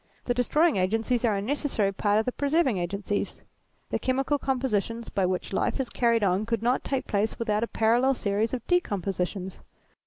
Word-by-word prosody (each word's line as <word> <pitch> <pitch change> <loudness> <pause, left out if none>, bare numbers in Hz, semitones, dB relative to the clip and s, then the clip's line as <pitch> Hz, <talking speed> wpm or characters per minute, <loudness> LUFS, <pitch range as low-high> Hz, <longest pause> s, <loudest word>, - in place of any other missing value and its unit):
The 245 - +1
destroying 295 +4 +2
agencies 225 +6 +1
are 215 -3 +2
a 195 - -2
necessary 250 -5 0
part 205 +1 +1
of 220 - +1
the 250 - 0
preserving 280 - +1
agencies: 200 +3 -3 0.5
the - - 0
chemical 270 +3 0
compositions 235 -4 -1
by 190 -2 0
which 185 +1 -3
life - - 0
is 265 - -2
carried 235 -2 +2
on 195 +2 +1
could 230 -1 -1
not 245 +2 +1
take 270 -2 -2
place 210 +1 0
without 215 -2 0
a 230 - 0
parallel 240 +5 +2
series 210 +1 0
of 245 -3 -4
decompositions. 195 - -1
225 Hz, 180 wpm, -27 LUFS, 200-255 Hz, 0.5 s, destroying